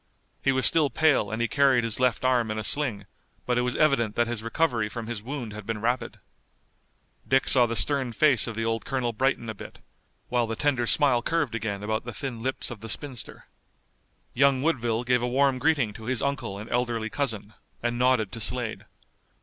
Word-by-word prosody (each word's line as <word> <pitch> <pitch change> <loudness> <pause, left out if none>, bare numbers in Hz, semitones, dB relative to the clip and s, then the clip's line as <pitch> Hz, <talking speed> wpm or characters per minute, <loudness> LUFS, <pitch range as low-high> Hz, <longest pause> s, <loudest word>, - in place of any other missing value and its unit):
He 135 - +2
was 130 -1 +1
still 155 -3 +4
pale 150 -10 +2
and 110 +2 -4
he - - +1
carried 135 -3 +3
his 115 0 -1
left 125 0 +1
arm 125 -3 +2
in 110 - -3
a 110 - -3
sling, 110 -4 0 0.4
but 125 0 +1
it - - +2
was 125 0 -1
evident 125 -8 +2
that 120 - +2
his 115 -2 -3
recovery 115 -2 0
from 115 +1 -6
his 115 -2 -5
wound 125 -2 -6
had 105 0 -8
been 110 +1 -4
rapid. 120 +3 -2 1.1
Dick 135 0 +2
saw 125 -2 +5
the 115 - -3
stern 130 +4 +2
face 130 -1 +3
of 115 - -5
the 115 +1 -2
old 115 0 -1
colonel 125 -3 -2
brighten 130 0 0
a 110 - -4
bit, 100 - -11 0.5
while 120 -1 0
the 115 - -3
tender 130 -3 0
smile 135 -4 +5
curved 150 -2 -1
again 105 -3 -3
about 110 +1 -2
the 120 -1 -7
thin 130 -3 -4
lips 130 +2 -3
of 120 - -8
the 115 +2 -8
spinster. 135 0 -3 0.9
Young 135 0 +3
Woodville 120 -7 0
gave 125 -1 +2
a 120 - -1
warm 135 +1 +2
greeting 135 -6 +1
to 110 +1 -11
his 125 -1 0
uncle 135 -8 -2
and 105 +2 -8
elderly 120 -2 -1
cousin, 110 -7 -3 0.3
and 120 0 -1
nodded 125 -5 +2
to 115 - -7
Slade. 120 0 -1
120 Hz, 205 wpm, -26 LUFS, 115-135 Hz, 1.1 s, saw